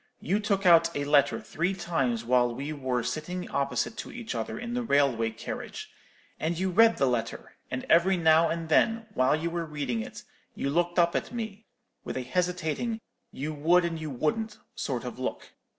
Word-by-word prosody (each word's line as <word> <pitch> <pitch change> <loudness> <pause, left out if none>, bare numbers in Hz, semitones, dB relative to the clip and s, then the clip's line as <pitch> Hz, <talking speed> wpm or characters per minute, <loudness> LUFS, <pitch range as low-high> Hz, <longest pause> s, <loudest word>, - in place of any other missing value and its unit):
You 195 +5 0
took 200 -2 0
out 170 -2 +7
a 145 - -1
letter 145 -1 +3
three 175 +4 -2
times 130 -11 -1
while 120 -1 +3
we 140 +4 -4
wore 130 -4 -1
sitting 180 +6 -4
opposite 140 - -1
to - - -6
each 240 -2 -6
other - - -3
in 240 0 -5
the 245 - 0
railway 140 - +2
carriage; 110 +1 -7 0.5
and 160 +2 -1
you 190 +1 0
read 225 +4 +5
the 135 - +3
letter; 120 -3 -2 0.2
and 125 - -4
every 185 +3 +4
now 160 0 +5
and 165 0 -3
then, 225 +8 +3
while 130 +3 +3
you 165 +2 -2
were 170 0 -2
reading 145 -7 -3
it, - - -8 0.3
you 140 - -2
looked 175 +3 0
up 170 0 +4
at - - -2
me 220 -3 -6 0.4
with - - -4
a 130 - -2
hesitating 180 - -1 0.3
you 150 +3 -4
would 170 +4 +3
and 165 -2 -3
you 155 - -4
wouldn't 210 - -1 0.2
sort - - -3
of - - -6
look. - - -4
165 Hz, 190 wpm, -28 LUFS, 140-185 Hz, 0.5 s, out